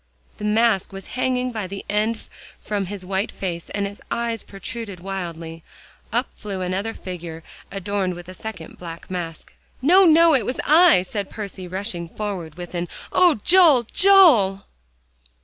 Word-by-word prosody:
The 210 - -4
mask 215 -2 +2
was 195 -1 -8
hanging 255 0 0
by 215 -5 -4
one 195 +1 -6
end 215 +2 0 0.4
from 200 -3 -3
his 195 -1 -7
white 195 +2 -2
face, 170 -3 -5
and 200 0 -2
his 200 +1 -7
eyes 235 -2 -2
protruded 200 0 -7
wildly. 170 -3 -6 0.5
Up 240 +4 0
flew 200 -3 -6
another 190 +5 -2
figure 170 -3 -7 0.3
adorned 195 -1 -2
with 175 0 -10
a 185 - -8
second 185 -4 -9
black 170 0 -9
mask. 165 -3 -6 0.3
"No, 365 +8 +6
no, 330 0 +6
it 260 -5 +3
was 250 - -3
I," 315 - +6
and 205 -3 -3
Percy 200 -3 -7
rushed 190 +3 -3 0.2
forward 185 -7 -4
with 175 0 -8
an 175 0 -2 0.3
"Oh, 350 - +4
Joel, 340 -9 +6
Joel!" 300 - +6
200 Hz, 155 wpm, -22 LUFS, 180-235 Hz, 0.5 s, No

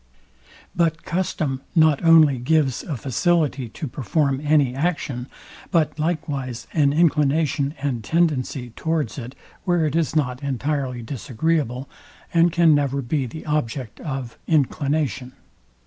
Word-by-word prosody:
But 165 -1 +1
custom 155 -7 -2
not 155 -3 +4
only 160 -5 +6
gives 135 0 +1
a 150 -6 -4
facility 140 0 0
to 155 +6 -6
perform 140 +2 0
any 145 -4 +3
action, 135 -4 -2 0.4
but 155 -4 +1
likewise 140 -7 -2
an 145 -3 +3
inclination 150 -2 +2
and 130 -6 -2
tendency 140 -5 0
towards 155 -1 -2
it, 125 +2 -8 0.3
where 175 -3 +2
it 150 0 -1
is 165 -2 0
not 125 -4 0
entirely 135 -2 -2
disagreeable, 135 +1 -2 0.5
and 170 0 +4
can 170 -2 +5
never 140 -1 +1
be 130 +2 -1
the 155 +7 -9
object 135 -6 -2
of 135 -6 -5
inclination. 140 - 0
145 Hz, 125 wpm, -22 LUFS, 130-160 Hz, 0.5 s, only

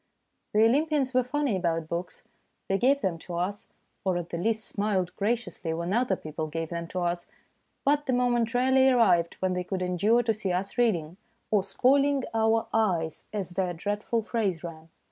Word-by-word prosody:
The 215 +1 +6
Olympians 280 +1 +2
were 255 - +4
funny 275 -2 0
about 165 -3 -1
books. 170 +2 -5 0.4
They 195 0 +1
gave 275 +3 +3
them 170 -3 -1
to 175 +1 -7
us, 185 +4 -3 0.4
or 185 -2 +1
at 175 -1 -5
the 170 - -4
least 220 +3 0
smiled 200 -4 -1
graciously 205 -6 -2
when 170 +3 -2
other 235 -4 +2
people 155 -1 -5
gave 165 +1 -4
them 170 -1 -4
to 180 +2 -4
us, 175 0 -2 0.6
but 290 +1 +2
the 260 - +1
moment 240 -1 +1
rarely 260 +1 +4
arrived 185 -10 +3
when 185 -1 +1
they 180 0 -2
could 185 0 -3
endure 205 +7 +2
to 225 -1 +1
see 205 -3 -3
us 185 +2 -2
reading, 180 -9 +1 0.3
or 205 -3 +3
spoiling 275 +7 +2
our 225 0 +2
eyes 175 -8 0
as 195 -4 -4
their 180 -1 -1
dread 205 +5 -3
ful 230 -1 0
phrase 205 -7 -1
ran. 160 -1 -8
200 Hz, 185 wpm, -27 LUFS, 175-240 Hz, 0.6 s, The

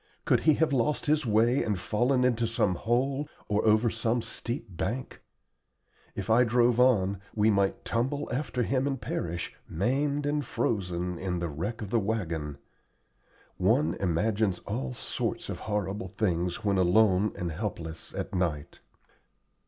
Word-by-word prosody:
Could - - +4
he 155 -1 +4
have 160 -1 +1
lost 135 +4 +1
his 150 -3 +2
way 115 +5 +3
and 105 -3 -1
fallen 120 +7 +1
into 120 -2 +2
some 110 -4 +1
hole 135 - 0 0.2
or 105 0 +1
over 110 +2 +4
some 115 +1 0
steep 115 -3 -5
bank? 120 +10 -3 0.9
If - - -4
I 115 +2 +5
drove 120 0 +3
on, 100 -7 +3 0.2
we 110 0 +4
might 100 -1 +1
tumble 135 +5 -1
after 125 -2 -1
him 130 +3 0
and 135 -2 -2
perish, 85 -5 -4
maimed 140 - 0
and 145 0 0
frozen, 90 -7 -2
in 90 -2 -2
the 85 -1 -2
wreck 100 +10 -4
of 100 - -7
the 115 - +3
wagon. 85 -9 -2 1.0
One 80 +2 +3
imagines 100 +2 +1
all 65 -1 -3
sorts - - -3
of - - -4
horrible 105 -1 -2
things 90 0 -1
when 100 -2 +2
alone 95 +2 +4
and 85 -1 -3
helpless 80 -3 -5
at - - -4
night. 85 -6 -2
110 Hz, 150 wpm, -28 LUFS, 90-125 Hz, 1.0 s, I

